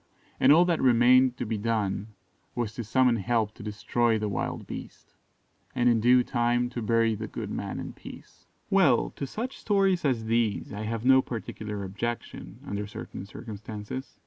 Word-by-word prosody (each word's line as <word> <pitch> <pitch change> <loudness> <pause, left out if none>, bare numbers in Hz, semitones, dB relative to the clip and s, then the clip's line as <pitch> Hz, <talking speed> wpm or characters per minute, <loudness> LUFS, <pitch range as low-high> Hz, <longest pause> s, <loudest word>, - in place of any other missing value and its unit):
and 130 - +6
all 170 +4 +7
that 170 -2 +1
remained 125 0 +5
to 125 - -3
be 110 -1 -2
done 105 -2 -1 0.5
was 120 -3 -2
to 120 - -5
summon 125 +2 +3
help 110 0 0
to - - -13
destroy 110 +2 0
the 105 0 -2
wild 100 - -3
beast, - - -9 0.6
and 125 - +2
in 115 -1 +3
due 125 +2 +5
time 120 0 0
to 125 - -4
bury 115 0 +2
the 110 +1 -5
good - - -6
man - - -4
in - - -6
peace. - - -13 0.2
Well, - - +4
to 140 - -5
such 240 - -5
stories 195 -4 +2
as 125 -6 0
these 115 -3 0
I 105 +1 -4
have 115 +1 -3
no 130 0 +7
particular 105 -4 -6
objection, 115 +5 -5
under 100 0 -4
certain 100 -1 -8
circumstances. 105 +3 -8
115 Hz, 170 wpm, -27 LUFS, 105-125 Hz, 0.6 s, all